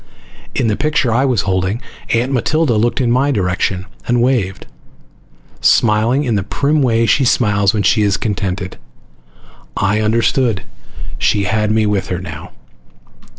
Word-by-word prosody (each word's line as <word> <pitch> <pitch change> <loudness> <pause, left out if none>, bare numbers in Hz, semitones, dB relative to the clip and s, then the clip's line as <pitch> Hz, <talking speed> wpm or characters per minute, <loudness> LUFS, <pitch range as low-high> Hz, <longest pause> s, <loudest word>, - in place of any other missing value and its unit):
In - - 0
the 110 -2 +1
picture 145 -4 0
I 130 +4 +2
was 125 -7 +1
holding, 95 +3 -1 0.3
Aunt 120 +3 +1
Matilda 140 +2 +1
looked 115 +4 +1
in 120 -3 +1
my 130 +4 +2
direction 95 -4 -1 0.2
and 120 0 +2
waved, 120 -6 0 0.9
smiling 115 +5 +3
in 120 -5 -1
the 100 - +1
prim 145 +9 0
way 115 -3 +2
she 135 - +2
smiles 105 -5 +2
when 105 -2 -1
she 105 - +3
is 100 -1 +2
contented. 95 -3 -3 1.0
I 105 +2 +1
understood. 115 0 +1 0.6
She 100 - +1
had 105 +2 0
me 110 0 +2
with 100 -2 -1
her 90 - -2
now. 85 -1 -8
110 Hz, 150 wpm, -16 LUFS, 100-125 Hz, 1.0 s, smiling